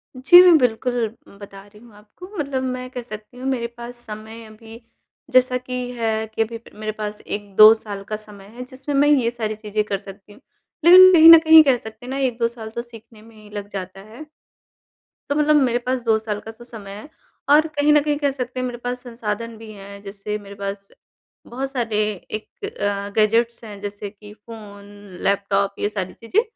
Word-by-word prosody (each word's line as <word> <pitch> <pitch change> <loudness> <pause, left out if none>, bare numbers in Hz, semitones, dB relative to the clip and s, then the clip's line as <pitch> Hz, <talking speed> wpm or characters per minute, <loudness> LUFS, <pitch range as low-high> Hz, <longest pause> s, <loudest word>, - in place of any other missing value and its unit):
जी। 260 +8 +8
मैं 355 -3 +7
बिल्कुल 245 -2 0 0.3
बता 200 -1 -11
रही 210 +1 -19
हूँ 235 -2 -18
आपको 210 - -14
मतलब 275 -3 -2
मैं 255 0 -4
कह 250 -1 -6
सकती 215 +1 -11
हूँ 255 - -8
मेरे 250 -3 -1
पास 240 +1 -9
समय 220 +2 -9
अभी 220 +1 -14 0.5
जैसा 255 0 +3
कि 255 0 -9 0.2
है 220 -1 -1
कि - - 0
अभी 225 +1 -3 0.2
मेरे 215 0 -3
पास 210 0 -5
1-2 205 +1 +5
साल 205 -3 -8
का 215 - -2
समय 210 -2 -11
है 250 - -7
जिसमें 265 +3 -6
मैं 285 +1 +4
ये 255 -6 +3
सारी 220 -2 -4
चीज़ें 210 0 -3
कर 205 -1 -3
सकती 195 +1 -14
हूँ, 205 - -20 0.4
लेकिन 370 +2 +9
कहीं 325 -1 +9
न 330 -1 +11
कहीं 320 0 +8
कह 270 -4 +3
सकते 220 +1 -12
हैं - - -8
ना 270 - -3
1-2 245 -4 0
साल 230 -2 -9
तो 235 - -2
सीखने 230 -2 -16
में 225 +1 -18
ही 215 -1 -16
लग 205 -1 -6
जाता 195 -1 -7
है। 225 +9 -12 1.0
तो 285 - 0
मतलब 300 0 +3
मेरे 240 -2 +1
पास 255 0 -1
2 225 -2 +2
साल 215 -1 -4
का 220 - -10
तो 225 +2 -16
समय 215 -5 -11
है 210 +8 -10 0.4
और 305 +2 +5
कहीं 300 -1 +1
न 300 - +6
कहीं 295 -1 -1
कह 285 -1 0
सकते 255 -1 -5
हैं 255 - -2
मेरे 245 -1 -6
पास 245 +1 -5
संसाधन 230 -1 -5
भी 220 0 -11
हैं, 200 -1 -12
जैसे 205 +1 -6
मेरे 200 -1 -12
पास 200 0 -6 0.6
बहुत 270 +3 -5
सारे 235 -5 -2 0.3
एक 215 - -7
अ, 205 - -3
गैजेट्स 230 +2 +1
हैं 210 -3 -10
जैसे 205 0 -6
कि 210 0 -15
फोन, 210 -2 -13 0.4
लैपटॉप 200 0 0
ये 205 - -1
सारी 190 -3 -5
चीज़ें। 300 - 0
225 Hz, 205 wpm, -21 LUFS, 210-255 Hz, 1.0 s, न